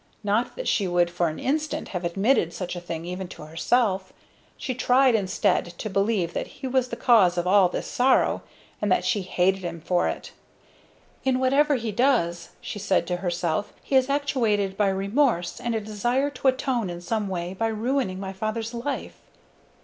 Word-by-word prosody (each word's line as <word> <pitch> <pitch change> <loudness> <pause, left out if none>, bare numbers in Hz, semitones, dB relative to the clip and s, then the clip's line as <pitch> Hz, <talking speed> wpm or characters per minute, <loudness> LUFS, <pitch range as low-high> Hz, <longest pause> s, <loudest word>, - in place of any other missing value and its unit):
Not 215 +4 0
that - - -5
she 200 - +2
would 175 -1 +2
for 175 0 +1
an 155 - -6
instant 305 +2 -2
have 180 -2 -4
admitted 185 +1 +1
such 180 -1 -4
a 175 - -5
thing 165 -1 -5
even 180 +1 -5
to 175 - -10
herself. 190 +4 0 0.5
She 255 - -3
tried 255 +1 +4
instead 185 -4 0
to 215 - -5
believe 195 -3 +1
that - - -3
he 270 - -10
was 260 -1 +1
the - - -5
cause 195 -8 +4
of 175 - 0
all 190 0 +5
this - - -4
sorrow, 255 +1 +2 0.4
and 210 - 0
that - - +2
she 215 -5 +1
hated 185 +1 +1
him 170 -1 -4
for 175 +2 +1
it. - - -5 0.9
"In 265 -1 +2
whatever 280 +3 +3
he 230 -3 -2
does," 205 -8 +1
she 205 - -6
said 190 -3 +1
to 180 0 -2
herself, 175 +1 -2
"he 275 - -1
is 260 0 +4
actuated 230 -9 +1
by 205 -1 +2
remorse, 195 0 +1
and 240 -2 -1
a - - +1
desire 240 +7 0
to 270 0 -2
atone 260 -5 +1
in 175 0 -5
some 210 +3 -2
way 180 -1 -3
for 225 +4 -1
ruining 220 -3 -1
my 190 0 -5
father's 220 +3 -3
life." 255 +4 -4
205 Hz, 190 wpm, -25 LUFS, 180-250 Hz, 0.9 s, all